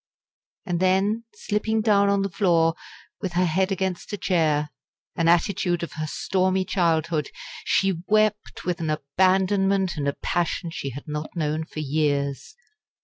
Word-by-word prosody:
And 175 -2 -1
then, 195 +5 +2
slipping 210 +1 -1
down 200 -2 +4
on 200 0 +2
the 195 - -1
floor, 165 -3 +3 0.5
with 190 -4 -3
her 180 +1 +2
head 185 +4 +1
against 190 -1 -2
a - - -1
chair 155 -6 +1 0.4
an 165 -1 +1
attitude 175 0 +2
of 170 - -5
her 155 -1 -4
stormy 185 +3 0
childhood 165 -5 0 0.4
she 190 -4 +1
wept 215 0 +1
with 180 0 -1
an 160 - -1
abandonment 190 +5 +2
and 140 -1 -1
a 140 - +1
passion 170 +1 -2
she 140 - -4
had 140 +4 -9
not 150 +2 -5
known 155 -1 -1
for 155 - -6
years. 145 - -1
175 Hz, 150 wpm, -24 LUFS, 155-195 Hz, 0.5 s, down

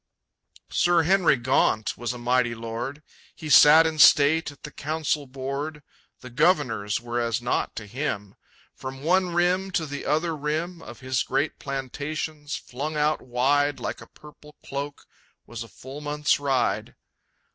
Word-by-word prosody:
Sir 175 -1 +3
Henry 180 -2 +4
Gaunt 120 -3 +1
was 120 0 -3
a 125 - -6
mighty 120 0 +1
lord. 115 +6 -5 0.3
He 155 - -8
sat 155 +3 +8
in 160 -1 -2
state 150 +2 +6
at 145 - -15
the - - -7
Council 150 -1 -2
board; 140 +3 -5 0.4
The 125 - -10
governors 125 - +1
were 120 0 -3
as 115 0 0
nought 120 +1 -1
to 105 - -6
him. 105 -4 -4 0.4
From 135 +1 -8
one 180 +1 +2
rim 180 +2 +2
to 160 - 0
the 145 -1 -6
other 160 +3 +1
rim 160 +4 -3
Of 120 +1 -11
his 130 -1 0
great 145 +2 -1
plantations, 145 +2 -4
flung 150 +5 -5
out 150 +1 +1
wide 140 +4 +1
Like - - -5
a - - -12
purple 150 0 -16
cloak, 140 +1 -5 0.4
was 120 -1 -8
a 115 - -6
full 130 +7 -10
month's 150 0 +1
ride. 125 -4 0
145 Hz, 155 wpm, -25 LUFS, 125-155 Hz, 0.4 s, sat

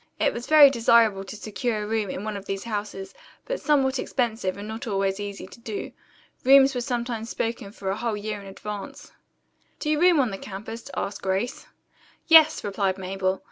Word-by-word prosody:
It - - +2
was 235 +1 -6
very 300 -3 +8
desirable 230 -5 +4
to 190 - -8
secure 215 +1 -3
a - - -4
room 215 -2 -1
in 185 - -5
one 215 -1 -4
of 200 -1 -7
these 195 0 -3
houses, 205 -3 -5 0.3
but - - -3
somewhat 270 -3 +2
expensive 225 -7 -1
and 205 +1 -7
not 225 +4 -6
always 195 -1 0
easy 205 -1 -6
to 190 - -14
do. 220 -3 -5 0.5
Rooms 270 +1 +7
were 250 - -2
sometimes 240 -2 -3
spoken 225 -3 -3
for 195 -2 -4
a - - -1
whole 230 -2 -2
year 210 0 -4
in 200 - -11
advance. 205 +1 -8 0.7
"Do 305 - -2
you 305 +1 +1
room 355 -3 +5
on 250 -6 +2
the 195 - -6
campus?" 215 +6 -8
asked 200 - -3
Grace. 195 +5 -2 0.6
"Yes," 320 -2 +7
replied 195 -2 -1
Mabel. 190 0 -2
215 Hz, 190 wpm, -25 LUFS, 195-245 Hz, 0.7 s, very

